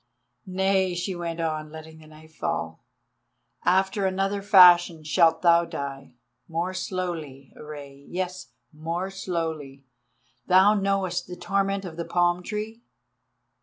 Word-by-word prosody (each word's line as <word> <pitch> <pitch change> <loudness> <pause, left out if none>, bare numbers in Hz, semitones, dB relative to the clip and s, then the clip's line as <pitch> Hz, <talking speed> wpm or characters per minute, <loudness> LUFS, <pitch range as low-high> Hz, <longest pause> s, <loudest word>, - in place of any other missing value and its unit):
"Nay," 190 -1 +1
she 175 +2 -3
went 170 -1 -5
on, 155 -2 -2
letting 160 0 -11
the 155 - -16
knife 155 +1 -16
fall; - - -4 0.8
"after 190 +2 +2
another 195 +1 -1
fashion 175 -4 +6
shalt 165 +3 +3
thou 170 -1 +5
die—more 140 +2 -6
slowly, 170 -8 -5
Rei, 140 -2 -11
yes, 185 0 -4 0.3
more 170 +5 -4
slowly. 160 -7 -4 0.6
Thou 190 +3 +6
knowest 195 -3 -1
the 180 - -7
torment 195 +1 -1
of 165 -3 -8
the 170 - -4
palm 175 0 +1
tree? 215 +4 -5
175 Hz, 120 wpm, -25 LUFS, 160-190 Hz, 0.8 s, fashion